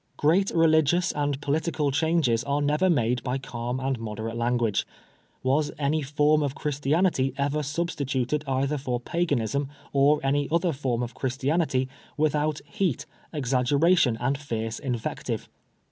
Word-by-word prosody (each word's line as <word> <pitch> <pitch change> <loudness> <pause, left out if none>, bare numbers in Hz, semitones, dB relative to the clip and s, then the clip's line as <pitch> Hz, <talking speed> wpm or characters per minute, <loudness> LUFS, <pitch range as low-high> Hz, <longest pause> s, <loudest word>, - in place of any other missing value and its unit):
' - - -41
Great 180 +7 +3
religious 165 +1 +3
and 145 -2 -1
political 150 0 0
changes 145 -6 +2
are 140 +1 0
never 150 +6 +2
made 125 -6 +2
by 125 +1 -2
calm 125 -1 -4
and 135 -2 -1
moderate 110 0 -5
lan 120 +1 +1
guage. 115 -4 +1 0.6
Was 145 +3 +1
any 150 +2 +1
form 150 +2 +2
of 140 -1 -1
Christianity 145 0 +1
ever 145 +2 0
substituted 145 -3 -1
either 135 +2 0
for 125 -3 -2
Paganism 140 -3 -1 0.2
or 145 +2 +4
any 140 +1 +1
other 170 0 +2
form 130 -3 -1
of 120 - -5
Christianity 135 +1 0 0.3
without 150 0 +1
heat, 195 - -1 0.3
exaggeration, 140 0 +2
and 135 +3 0
fierce 115 -5 -4
invective? 125 -5 -3
140 Hz, 140 wpm, -26 LUFS, 130-155 Hz, 0.6 s, or